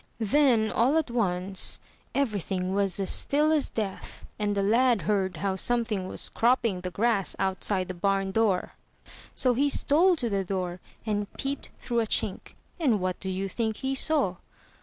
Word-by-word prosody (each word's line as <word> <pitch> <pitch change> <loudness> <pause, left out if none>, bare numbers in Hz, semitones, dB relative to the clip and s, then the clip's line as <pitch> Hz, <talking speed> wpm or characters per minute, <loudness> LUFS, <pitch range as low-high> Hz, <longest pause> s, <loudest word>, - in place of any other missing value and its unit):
Then 230 -1 +3
all 260 +7 +3
at 310 -6 0
once 190 -4 -1 0.4
everything 195 -8 -1
was 200 -1 0
as 195 - 0
still 300 +2 +2
as 305 -3 +2
death 205 -4 -5
and 205 -1 0
the 200 - +1
lad 230 -1 +3
heard 190 -2 0
how 195 +2 -1
something 220 -2 -1
was - - -3
cropping 230 -5 +1
the 180 - -4
grass 205 0 0
outside 190 0 0
the 185 - -4
barn 195 +2 0
door, 200 -3 +1 0.6
so 255 -2 +3
he 280 +4 +2
stole 335 +7 +3
to 250 -7 -3
the 200 -3 0
door, 180 -1 -3 0.3
and 205 -2 -2
peeped 275 0 -4
through 240 -2 -1
a 225 - 0
chink; 195 - -1 0.2
and 255 -10 +2
what 185 0 -2
do 190 - -5
you 190 +1 -2
think 220 +2 -2
he 265 0 -2
saw? 270 - +3
210 Hz, 170 wpm, -27 LUFS, 190-245 Hz, 0.6 s, Then